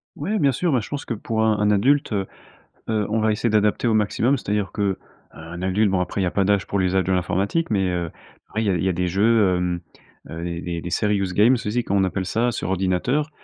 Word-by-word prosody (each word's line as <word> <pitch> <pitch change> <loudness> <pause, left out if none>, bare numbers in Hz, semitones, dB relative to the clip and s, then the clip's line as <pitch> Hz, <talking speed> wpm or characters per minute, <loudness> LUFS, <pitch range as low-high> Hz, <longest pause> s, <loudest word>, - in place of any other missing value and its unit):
Ouais 200 +9 -2
bien 140 -3 +3
sûr, 170 +7 0
ben, 130 - +3
je 105 - -7
pense 145 - -5
que - - -4
pour 110 0 -2
un 110 -1 +2
un 105 0 +3
adulte, 130 +5 +2
heu, 100 -2 0 0.6
heu, 110 -2 +1
on 110 +1 0
va 110 0 +2
essayer 110 +2 0
d'adapter 105 +2 +2
au 115 - +2
maximum, 110 +5 +2
c'est-à-dire 105 -4 -2
qu'un 90 -4 -5
adulte, 95 +3 +2
bon 95 -1 +1
après 90 - -3
il 95 - +1
y - - +1
a - - -2
pas 100 - +1
d'âge 100 0 +1
pour 100 - -1
l'usage 95 0 +1
de 95 - +1
l'informatique, 95 - 0
mais, 100 -4 +1
heu, 85 -2 -2 0.4
ouais 110 - 0
il - - -2
y - - +2
a 95 - +2
il 85 - -1
y 95 - +2
a - - +2
des 90 +1 -1
jeux, 100 +1 +3
hem, 90 -1 -1 0.5
heu, 80 +1 -6
des 85 -1 -4
des 85 -1 -4
des 85 - -5
serious 100 -1 0
games, 110 +7 +5
aussi 120 0 -1
comme 100 - -1
on 95 - +3
appelle 95 0 -1
ça 120 +6 0
sur 105 - -4
ordinateur, 95 - 0
100 Hz, 260 wpm, -22 LUFS, 95-110 Hz, 0.6 s, games